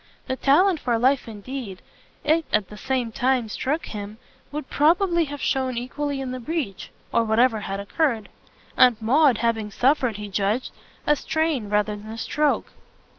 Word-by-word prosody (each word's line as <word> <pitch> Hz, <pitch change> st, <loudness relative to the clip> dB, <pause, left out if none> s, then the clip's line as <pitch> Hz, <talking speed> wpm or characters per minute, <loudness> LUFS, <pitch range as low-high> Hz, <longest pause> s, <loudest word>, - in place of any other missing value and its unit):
The 260 Hz, -, -2 dB
talent 325 Hz, +7 st, +4 dB
for 240 Hz, -4 st, 0 dB
life 260 Hz, +3 st, +2 dB
indeed, 220 Hz, -2 st, -7 dB, 0.4 s
it 315 Hz, +1 st, +2 dB
at 210 Hz, -3 st, +1 dB
the 210 Hz, -, -10 dB
same 245 Hz, +1 st, -2 dB
time 250 Hz, 0 st, +1 dB
struck 295 Hz, +8 st, -2 dB
him, 210 Hz, 0 st, -7 dB, 0.3 s
would 300 Hz, -2 st, -5 dB
probably 340 Hz, +3 st, +3 dB
have 290 Hz, -1 st, -7 dB
shown 260 Hz, -2 st, 0 dB
equally 280 Hz, +3 st, -3 dB
in 265 Hz, -1 st, -4 dB
the 255 Hz, -, -4 dB
breach, 250 Hz, -, -4 dB, 0.2 s
or 230 Hz, -, +4 dB
whatever 225 Hz, +1 st, +3 dB
had 195 Hz, -1 st, -4 dB
occurred; 220 Hz, 0 st, 0 dB, 0.5 s
Aunt 245 Hz, -3 st, +5 dB
Maud 260 Hz, +3 st, +4 dB
having 225 Hz, -2 st, 0 dB
suffered, 255 Hz, 0 st, +2 dB
he 210 Hz, 0 st, -6 dB
judged, 205 Hz, +5 st, -1 dB, 0.3 s
a 295 Hz, -, +4 dB
strain 305 Hz, -7 st, -1 dB
rather 210 Hz, 0 st, +1 dB
than 210 Hz, +1 st, -10 dB
a 225 Hz, -, -6 dB
stroke. 295 Hz, +5 st, 0 dB
250 Hz, 165 wpm, -24 LUFS, 215-290 Hz, 0.5 s, Aunt